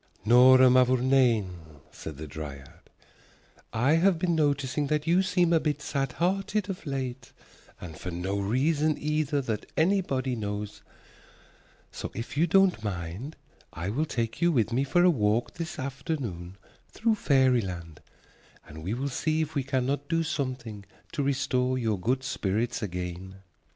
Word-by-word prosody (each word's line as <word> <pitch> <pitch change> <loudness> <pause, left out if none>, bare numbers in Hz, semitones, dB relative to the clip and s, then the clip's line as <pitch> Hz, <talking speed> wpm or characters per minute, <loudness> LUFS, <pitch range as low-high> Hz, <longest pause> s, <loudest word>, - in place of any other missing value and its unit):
"Nora 130 +3 +7
Mavourneen," 125 -6 +3 0.3
said 75 -3 -8
the 80 - -6
dryad, 70 -2 -9 0.8
"I 130 +8 +3
have 180 +1 +3
been 170 +1 0
noticing 145 -2 0
that 150 +1 0
you 175 +3 +4
seem 180 -3 +2
a 165 - +5
bit 150 -1 -1
sad 135 -2 -2
hearted 195 +4 0
of 180 -4 -9
late, 130 -2 -4 0.5
and 85 -3 -8
for 90 - -6
no 90 +3 -2
reason 145 +9 +1
either 150 -1 0
that 110 -5 -4
anybody 155 -8 +1
knows, 105 -1 -5 1.1
so - - -6
if 115 +4 -6
you 160 +4 +3
don't 185 - +3
mind 100 - -5 0.4
I 85 +4 -4
will 145 +8 0
take 115 -3 -3
you 170 0 +4
with 115 -6 +1
me 130 +3 +2
for 175 +6 +2
a 180 - +6
walk 110 -4 0
this 170 +1 -6
afternoon 130 - -5 0.3
through 225 0 +1
fairyland, 120 - +1 0.7
and 80 +1 -10
we 100 +7 -2
will 135 +3 -2
see 155 +4 0
if 155 +1 -7
we 140 - 0
cannot 135 +2 -1
do 165 0 +1
something 130 -9 -4 0.3
to 150 - -2
restore 130 -2 0
your 110 -5 -1
good 125 +7 0
spirits 115 -2 -1
again." 90 -1 -5
130 Hz, 150 wpm, -27 LUFS, 105-155 Hz, 1.1 s, Nora